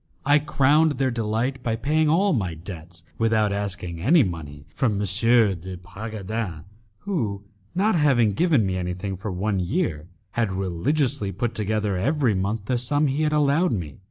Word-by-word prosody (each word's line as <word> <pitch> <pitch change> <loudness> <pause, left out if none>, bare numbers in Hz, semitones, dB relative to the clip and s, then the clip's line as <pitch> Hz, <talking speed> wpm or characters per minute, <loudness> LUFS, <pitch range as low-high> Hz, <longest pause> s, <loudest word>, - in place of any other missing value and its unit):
I 145 +2 +5
crowned 150 +1 +3
their 135 -1 0
delight 115 +3 -1
by 115 -2 -1
paying 150 +6 +1
all 190 +5 +3
my 95 - -1
debts 85 0 -10 0.2
without 110 -2 +2
asking 95 -4 -4
any 150 - +5
money 75 -6 -6
from 120 -5 +1
M. 100 - -2
de 100 -3 +2
Bragadin, 100 -1 -5 0.4
who, 110 - -2 0.3
not 205 +4 +2
having 135 - +3
given 145 - +2
me 95 -1 -1
anything 90 +2 -3
for 100 +3 -5
one 95 +2 -1
year, 90 - -1 0.2
had 115 -3 0
religiously 95 - -1
put 115 +5 -2
together 105 -2 -1
every 135 - +1
month 100 +2 -2
the 125 +2 0
sum 145 +5 +1
he 140 +2 0
had 155 -1 +1
allowed 150 +4 +2
me. 80 -9 -5
110 Hz, 160 wpm, -24 LUFS, 95-140 Hz, 0.4 s, I